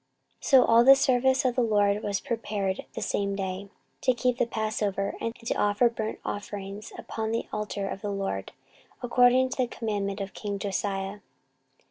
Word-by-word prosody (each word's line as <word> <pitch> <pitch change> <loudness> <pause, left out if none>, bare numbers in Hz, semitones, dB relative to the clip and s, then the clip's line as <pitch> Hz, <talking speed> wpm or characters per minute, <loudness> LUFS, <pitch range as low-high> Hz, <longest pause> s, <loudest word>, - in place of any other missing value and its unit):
14:035:016 - - -4
So 265 -3 +7
all 230 +1 +6
the 270 +2 +9
service 260 +1 +2
of 250 -2 +2
the 255 - +2
LORD 205 -2 +2
was 200 -3 -1
prepared 205 -5 -2
the - - -3
same 200 -1 -1
day, 195 0 -4 0.3
to 255 - +2
keep 250 +1 0
the 245 - +2
passover, 215 -3 -1
and 230 0 -2
to 230 -1 -3
offer 205 +4 +3
burnt 220 -1 -4
offerings 205 0 -6
upon 220 -1 -4
the 230 +1 -1
altar 210 -2 -3
of 195 0 -5
the 205 - -3
LORD, 195 - -3 0.5
according 245 +1 +4
to 260 - -5
the 255 -2 +1
commandment 205 -4 -3
of 195 -1 -5
king 205 -2 -4
Josiah. 195 0 -3
210 Hz, 175 wpm, -27 LUFS, 200-240 Hz, 0.5 s, the